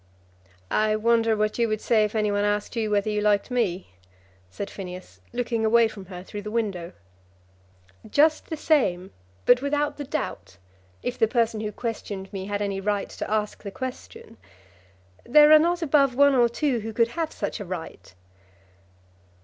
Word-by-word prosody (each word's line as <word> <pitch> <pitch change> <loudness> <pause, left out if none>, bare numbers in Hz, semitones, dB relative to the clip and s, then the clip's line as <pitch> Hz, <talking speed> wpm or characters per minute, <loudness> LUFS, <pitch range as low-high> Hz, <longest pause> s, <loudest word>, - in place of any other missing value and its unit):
"I 215 0 +2
wonder 225 0 +2
what 215 +2 -1
you 235 - +3
would 215 -1 -1
say 220 -1 +2
if 210 +1 -2
any 210 -1 +1
one 205 0 0
asked 205 +3 -1
you 220 -2 -1
whether 210 0 +1
you 210 0 -1
liked 210 +3 +1
me," 195 - -1 0.6
said 200 - -6
Phineas, 185 -2 -9
looking 240 -2 -2
away 230 +1 +5
from 205 -3 -10
her 180 -1 -8
through 205 +2 -7
the 210 - -6
window. 200 -6 -3 1.2
"Just 305 +6 +3
the 320 - -3
same; 195 - +1 0.3
but 245 0 +5
without 290 +1 -1
the 290 - -4
doubt, 290 +1 -5 0.5
if 245 - -4
the 225 - +4
person 225 -2 0
who 210 -1 -3
questioned 205 -4 -6
me 190 -1 -4
had 205 0 -2
any 195 -1 -3
right 205 0 -1
to - - -6
ask 210 0 -1
the 200 - -6
question. 260 - -8 0.9
There 300 +4 +6
are 310 - +9
not 345 +2 +1
above 275 -4 +3
one 285 +1 +5
or 240 -2 +4
two 250 +1 0
who 220 +1 -6
could 230 +1 +2
have 325 +3 -3
such - - -4
a 205 - -6
right." 170 - -8
220 Hz, 175 wpm, -25 LUFS, 205-250 Hz, 1.2 s, are